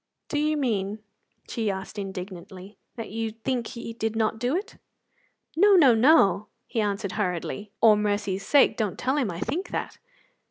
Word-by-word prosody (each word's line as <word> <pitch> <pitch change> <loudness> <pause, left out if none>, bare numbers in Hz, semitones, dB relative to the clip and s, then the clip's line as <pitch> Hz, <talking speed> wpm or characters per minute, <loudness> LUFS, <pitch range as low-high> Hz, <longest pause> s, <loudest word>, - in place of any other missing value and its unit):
"Do 295 - 0
you 305 +1 +1
mean," 210 -7 -1 0.5
she 225 -4 -2
asked 195 +2 -5
indignantly, 190 0 -8 0.2
"that 230 - -7
you 225 +1 -2
think 230 +2 -3
he 235 -2 -7
did 225 -1 -3
not 220 0 0
do 245 +6 0
it?" 390 +4 -4 0.8
"No, 400 +4 +6
no, 280 -9 +7
no," 220 - +4 0.2
he 230 - -2
answered 200 -1 -2
hurriedly; 200 +1 -3
"or 220 -2 +7
mercy's 205 -2 -1
sake, 280 +7 +4
don't 210 -5 -1
tell 265 +3 0
him 255 -7 +1
I 170 -1 -5
think 320 - -3
that." - - -4
220 Hz, 165 wpm, -26 LUFS, 200-255 Hz, 0.8 s, no